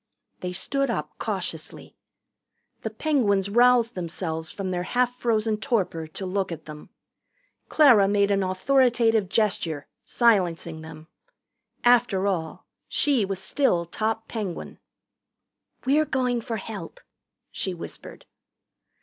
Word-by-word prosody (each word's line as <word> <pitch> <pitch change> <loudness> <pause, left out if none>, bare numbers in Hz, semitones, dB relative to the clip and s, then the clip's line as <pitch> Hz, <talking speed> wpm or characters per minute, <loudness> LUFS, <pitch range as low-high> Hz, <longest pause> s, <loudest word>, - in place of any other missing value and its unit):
They 180 - -4
stood 275 +9 0
up 150 -9 -2
cautiously. 185 -7 -5 0.9
The - - -3
Penguins 205 -11 +1
roused 240 0 +4
themselves 165 -2 -4
from 190 -2 -4
their 175 -1 -1
half 245 +6 0
frozen 225 -3 0
torpor 195 - -1
to 175 +5 -6
look 190 0 -1
at 165 - -7
them. 150 -1 -10 0.8
Clara 245 -10 +6
made 200 0 +2
an 200 0 +2
authoritative 225 +1 +2
gesture, 180 -9 0 0.2
silencing 175 -8 +1
them. 160 0 -11 0.8
After 240 -6 +4
all, 170 -5 -2 0.2
she 270 -8 +2
was 195 0 -3
still 190 -3 +1
top 220 +5 -2
Penguin. 205 -6 -5 1.1
"We're 295 +4 +3
going 250 -4 0
for 225 0 -4
help," 210 - -8 0.5
she 190 -2 -3
whispered. 170 - -9
200 Hz, 115 wpm, -25 LUFS, 180-240 Hz, 1.1 s, Clara